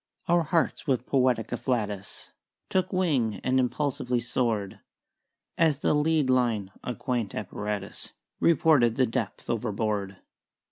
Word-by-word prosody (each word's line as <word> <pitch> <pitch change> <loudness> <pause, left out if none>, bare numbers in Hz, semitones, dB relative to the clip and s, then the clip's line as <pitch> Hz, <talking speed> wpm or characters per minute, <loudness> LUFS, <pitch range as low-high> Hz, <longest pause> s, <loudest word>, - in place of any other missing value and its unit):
"Our 175 0 +4
hearts 165 0 0
with 130 -3 +1
poetic 125 -4 +2
afflatus 105 -6 -3 0.4
Took 185 0 +1
wing 145 - +1
and 130 0 +2
impulsively 125 -1 0
soared 115 -4 -1 0.8
As 160 -4 +4
the 150 - +1
lead 150 -1 +2
line 120 -6 +1
(a 125 - -3
quaint 120 -5 -2
apparatus) 105 0 -4 0.3
Reported 150 -8 +4
the 130 - +3
depth 115 -4 -3
overboard. 105 -3 -2
125 Hz, 120 wpm, -27 LUFS, 110-145 Hz, 0.8 s, Our